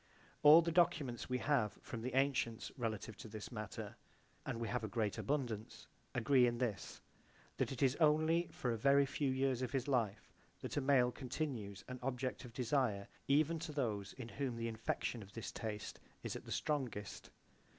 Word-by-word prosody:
All 155 Hz, +3 st, +9 dB
the 170 Hz, -, 0 dB
documents 145 Hz, -9 st, +2 dB
we 125 Hz, -, +1 dB
have 125 Hz, -6 st, +1 dB
from 115 Hz, -, -5 dB
the 125 Hz, +2 st, -3 dB
antients 135 Hz, -4 st, +1 dB
relative 110 Hz, -3 st, -3 dB
to -, -, -8 dB
this 110 Hz, +2 st, -7 dB
matter, 105 Hz, -4 st, -6 dB, 0.5 s
and 115 Hz, -, -2 dB
we 115 Hz, -, -2 dB
have 125 Hz, 0 st, -1 dB
a -, -, -1 dB
great 110 Hz, -1 st, -1 dB
abundance, 125 Hz, -7 st, -2 dB, 0.3 s
agree 125 Hz, +1 st, +5 dB
in 120 Hz, 0 st, 0 dB
this, 115 Hz, -7 st, -3 dB, 0.6 s
that -, -, 0 dB
it 135 Hz, 0 st, -1 dB
is 130 Hz, -2 st, +4 dB
only 155 Hz, +2 st, +4 dB
for 125 Hz, -, -2 dB
a 115 Hz, -, -1 dB
very 140 Hz, +4 st, +5 dB
few 135 Hz, +1 st, -1 dB
years 130 Hz, -1 st, +1 dB
of 130 Hz, +1 st, -2 dB
his 135 Hz, -1 st, 0 dB
life 115 Hz, -7 st, 0 dB, 0.3 s
that -, -, -4 dB
a 145 Hz, -, +1 dB
male 130 Hz, -3 st, +4 dB
continues 120 Hz, -8 st, -4 dB
an 125 Hz, 0 st, -6 dB
object 130 Hz, 0 st, -2 dB
of 120 Hz, -, -9 dB
desire 120 Hz, -5 st, 0 dB, 0.2 s
even 155 Hz, +4 st, +3 dB
to 165 Hz, -1 st, -5 dB
those 110 Hz, -9 st, -2 dB
in 125 Hz, -3 st, -7 dB
whom 135 Hz, -2 st, -2 dB
the 115 Hz, 0 st, -2 dB
infection 115 Hz, +1 st, -2 dB
of 100 Hz, 0 st, -12 dB
this 115 Hz, -, -5 dB
taste 105 Hz, -2 st, -5 dB, 0.2 s
is -, -, -3 dB
at -, -, -7 dB
the -, -, -9 dB
strongest. 125 Hz, -9 st, -2 dB
125 Hz, 185 wpm, -37 LUFS, 110-140 Hz, 0.6 s, All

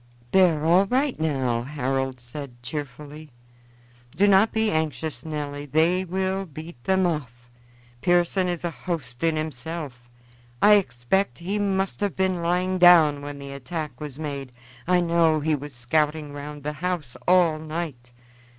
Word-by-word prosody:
"They 190 Hz, -1 st, +6 dB
are 155 Hz, -2 st, -2 dB
all 180 Hz, +4 st, +5 dB
right 260 Hz, -, 0 dB
now," 130 Hz, -7 st, 0 dB
Harold 135 Hz, -1 st, -2 dB
said 120 Hz, 0 st, -9 dB
cheerfully. 150 Hz, +2 st, -7 dB, 0.9 s
"Do 195 Hz, +5 st, +4 dB
not 200 Hz, +2 st, +5 dB
be 220 Hz, -1 st, +1 dB
anxious, 155 Hz, -4 st, -2 dB
Nelly; 145 Hz, -2 st, -5 dB
they 165 Hz, +6 st, +2 dB
will 190 Hz, +1 st, -2 dB
beat 155 Hz, -4 st, -10 dB
them 190 Hz, -1 st, +3 dB
off, 125 Hz, -7 st, -4 dB, 0.5 s
Pearson 175 Hz, +1 st, +2 dB
is 175 Hz, -2 st, -3 dB
a 170 Hz, -, -1 dB
host 145 Hz, -9 st, -5 dB
in 165 Hz, -1 st, +2 dB
himself. 150 Hz, -4 st, -5 dB, 0.5 s
I 210 Hz, +7 st, +7 dB
expect 190 Hz, -, +1 dB
he 195 Hz, +5 st, -3 dB
must 195 Hz, -1 st, 0 dB
have 205 Hz, -2 st, -1 dB
been 190 Hz, -2 st, 0 dB
lying 180 Hz, +2 st, 0 dB
down 165 Hz, -5 st, +7 dB
when 145 Hz, 0 st, -7 dB
the 140 Hz, 0 st, -8 dB
attack 150 Hz, +3 st, -6 dB
was 145 Hz, -3 st, -7 dB
made. 140 Hz, -4 st, -5 dB, 0.3 s
I 180 Hz, 0 st, +4 dB
know 165 Hz, -2 st, +3 dB
he 155 Hz, +1 st, 0 dB
was 145 Hz, 0 st, -4 dB
scouting 150 Hz, +4 st, 0 dB
round 145 Hz, 0 st, -8 dB
the 150 Hz, +1 st, -3 dB
house 175 Hz, -9 st, -2 dB
all 175 Hz, -4 st, +4 dB
night. 155 Hz, -6 st, -5 dB
155 Hz, 150 wpm, -25 LUFS, 140-180 Hz, 0.9 s, I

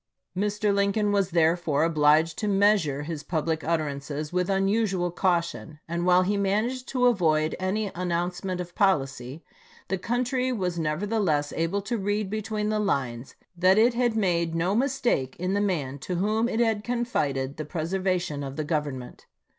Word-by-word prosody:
Mr. 205 Hz, +1 st, 0 dB
Lincoln 200 Hz, +1 st, +1 dB
was 200 Hz, -2 st, +1 dB
therefore 165 Hz, -3 st, +2 dB
obliged 155 Hz, 0 st, +3 dB
to 210 Hz, -, -1 dB
measure 195 Hz, -8 st, +2 dB
his 155 Hz, -1 st, -5 dB
public 160 Hz, -1 st, -2 dB
utterances 150 Hz, -1 st, -2 dB
with 180 Hz, +1 st, 0 dB
unusual 195 Hz, -2 st, +1 dB
caution; 170 Hz, -3 st, -1 dB
and 170 Hz, +2 st, -2 dB
while 180 Hz, 0 st, +5 dB
he 200 Hz, +2 st, 0 dB
managed 215 Hz, +6 st, 0 dB
to 250 Hz, -2 st, +1 dB
avoid 160 Hz, -9 st, +2 dB
any 195 Hz, +2 st, -1 dB
an 180 Hz, +1 st, -3 dB
nouncement 180 Hz, +2 st, -2 dB
of 175 Hz, -1 st, -6 dB
policy, 140 Hz, -, 0 dB, 0.5 s
the 190 Hz, -, -1 dB
country 250 Hz, +4 st, 0 dB
was 180 Hz, -7 st, -2 dB
neverthe 200 Hz, +8 st, -1 dB
less 145 Hz, -4 st, 0 dB
able 170 Hz, +5 st, -1 dB
to 235 Hz, +2 st, -2 dB
read 205 Hz, 0 st, -1 dB
between 215 Hz, 0 st, -2 dB
the 215 Hz, 0 st, 0 dB
lines 130 Hz, -, -2 dB, 0.2 s
that 185 Hz, +3 st, +4 dB
it 235 Hz, +3 st, +5 dB
had 240 Hz, -1 st, +1 dB
made 170 Hz, -5 st, +1 dB
no 175 Hz, +4 st, +1 dB
mistake 240 Hz, -, 0 dB
in 180 Hz, +2 st, -2 dB
the 205 Hz, -, +1 dB
man 145 Hz, -9 st, -1 dB
to 180 Hz, +7 st, -4 dB
whom 215 Hz, +6 st, +1 dB
it 225 Hz, -, -1 dB
had 225 Hz, -3 st, +1 dB
confided 145 Hz, -, -1 dB
the 155 Hz, -, -3 dB
preservation 175 Hz, -1 st, -2 dB
of 135 Hz, 0 st, -6 dB
the 155 Hz, -, -2 dB
Government. 145 Hz, -5 st, -4 dB
180 Hz, 165 wpm, -26 LUFS, 155-210 Hz, 0.5 s, while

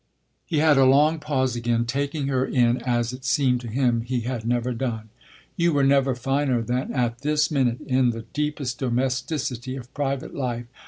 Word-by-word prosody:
He 165 Hz, -, -1 dB
had 150 Hz, -2 st, +4 dB
a 135 Hz, -, +6 dB
long 150 Hz, +5 st, +4 dB
pause 130 Hz, -5 st, -1 dB
again, 120 Hz, 0 st, 0 dB
taking 140 Hz, +4 st, -2 dB
her 130 Hz, -2 st, +1 dB
in 120 Hz, -2 st, +2 dB
as 120 Hz, -1 st, 0 dB
it 130 Hz, +1 st, -9 dB
seemed 130 Hz, -2 st, +2 dB
to 120 Hz, -, -7 dB
him 120 Hz, 0 st, +1 dB
he 120 Hz, +1 st, -2 dB
had 115 Hz, -1 st, -4 dB
never 120 Hz, +1 st, 0 dB
done. 115 Hz, -3 st, -4 dB, 0.5 s
"You 170 Hz, -1 st, +2 dB
were 140 Hz, -1 st, +2 dB
never 135 Hz, -1 st, +3 dB
finer 135 Hz, -1 st, 0 dB
than 125 Hz, +3 st, -2 dB
at 120 Hz, -2 st, -1 dB
this 150 Hz, +2 st, +1 dB
minute, 125 Hz, -5 st, +1 dB
in 130 Hz, -1 st, +2 dB
the 115 Hz, -1 st, -4 dB
deepest 150 Hz, -4 st, -2 dB
domesticity 130 Hz, 0 st, -2 dB
of 125 Hz, -1 st, -10 dB
private 140 Hz, -2 st, -3 dB
life. 120 Hz, -3 st, -3 dB
130 Hz, 180 wpm, -24 LUFS, 120-140 Hz, 0.5 s, a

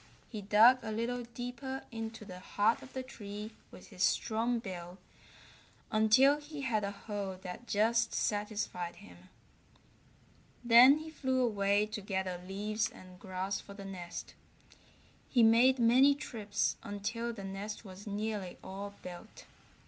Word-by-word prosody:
He 215 Hz, -4 st, -5 dB
dug 220 Hz, +6 st, +6 dB
a 220 Hz, -1 st, -5 dB
little 235 Hz, +3 st, -2 dB
deeper 245 Hz, +3 st, -6 dB
into 225 Hz, -1 st, -6 dB
the 180 Hz, -2 st, -9 dB
heart 210 Hz, +4 st, +1 dB
of 265 Hz, -, -13 dB
the 260 Hz, -, -3 dB
tree 210 Hz, -3 st, -7 dB, 0.2 s
with -, -, -13 dB
his -, -, -9 dB
strong 230 Hz, +2 st, +2 dB
bill 180 Hz, -5 st, -7 dB, 0.9 s
until 230 Hz, +7 st, +5 dB
he 295 Hz, 0 st, -8 dB
had 225 Hz, -6 st, 0 dB
a 200 Hz, -, -1 dB
hole 200 Hz, -2 st, -5 dB
that 185 Hz, +6 st, -7 dB
just 225 Hz, +2 st, +2 dB
satisfied 205 Hz, -4 st, -2 dB
him. 90 Hz, +1 st, -15 dB, 1.3 s
Then 245 Hz, +4 st, +8 dB
he 315 Hz, +1 st, -8 dB
flew 260 Hz, -4 st, 0 dB
away 205 Hz, -2 st, +2 dB
to 215 Hz, 0 st, -6 dB
gather 190 Hz, -2 st, -3 dB
leaves 210 Hz, +3 st, -1 dB
and 185 Hz, -1 st, -14 dB
grass 190 Hz, -1 st, -3 dB
for 200 Hz, -, -12 dB
the 200 Hz, -1 st, -9 dB
nest. 180 Hz, -3 st, -7 dB, 1.0 s
He 240 Hz, -3 st, +4 dB
made 240 Hz, +4 st, +6 dB
many 255 Hz, +4 st, +6 dB
trips 215 Hz, -6 st, -2 dB
until 220 Hz, +4 st, -3 dB
the 215 Hz, -4 st, -8 dB
nest 200 Hz, +3 st, -6 dB
was 195 Hz, +2 st, -10 dB
nearly 205 Hz, -2 st, -3 dB
all 200 Hz, +1 st, -7 dB
built. 180 Hz, +4 st, -10 dB
215 Hz, 140 wpm, -33 LUFS, 195-235 Hz, 1.3 s, Then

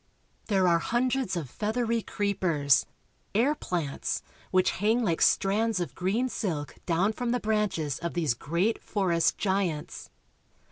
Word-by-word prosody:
There 195 Hz, -4 st, +3 dB
are 170 Hz, -1 st, +4 dB
hundreds 245 Hz, +1 st, 0 dB
of 160 Hz, -5 st, -3 dB
feathery 225 Hz, -, -1 dB
creepers, 175 Hz, -11 st, +1 dB, 0.5 s
air 255 Hz, +8 st, +4 dB
plants, 170 Hz, -, -3 dB, 0.3 s
which 185 Hz, 0 st, +3 dB
hang 225 Hz, +4 st, +3 dB
like 170 Hz, -6 st, 0 dB
strands 210 Hz, +1 st, +3 dB
of 165 Hz, -7 st, -3 dB
green 205 Hz, -, 0 dB
silk 165 Hz, -, -3 dB
down 185 Hz, +5 st, +2 dB
from 245 Hz, +1 st, -3 dB
the 245 Hz, +1 st, +1 dB
branches 210 Hz, -, -1 dB
of 170 Hz, 0 st, -4 dB
these 160 Hz, -7 st, +1 dB
great 170 Hz, -, -1 dB
forest 175 Hz, -6 st, +1 dB
giants. 190 Hz, -6 st, -2 dB
195 Hz, 135 wpm, -28 LUFS, 170-225 Hz, 0.5 s, are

